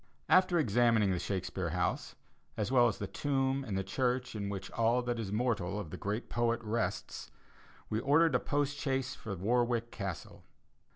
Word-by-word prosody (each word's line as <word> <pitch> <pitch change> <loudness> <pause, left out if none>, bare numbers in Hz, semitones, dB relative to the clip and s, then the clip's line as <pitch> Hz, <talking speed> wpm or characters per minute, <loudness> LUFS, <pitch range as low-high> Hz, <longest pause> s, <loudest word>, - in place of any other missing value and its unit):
After 185 -1 +5
examining 115 - +3
the 90 - 0
Shakespeare 95 -2 -2
House, 90 +2 -1 0.4
as 105 +2 -1
well 120 -2 +6
as 110 - -1
the 100 - -3
tomb 135 +3 0
and 105 -7 -3
the 95 - 0
church 125 +4 -1
in 100 -2 -3
which 95 -1 -5
all 115 +2 +2
that 120 -1 -2
is 105 -4 -4
mortal 105 -4 0
of 90 -7 -6
the - - -5
great 105 +4 -3
poet 120 0 +1
rests, 110 +1 -3 0.6
we 110 - -1
ordered 145 +5 +4
a 125 - +4
post 145 0 -1
chaise 135 -2 -1
for 105 -4 -6
Warwick 120 +4 +1
Castle. 95 -5 -6
115 Hz, 175 wpm, -32 LUFS, 100-130 Hz, 0.6 s, well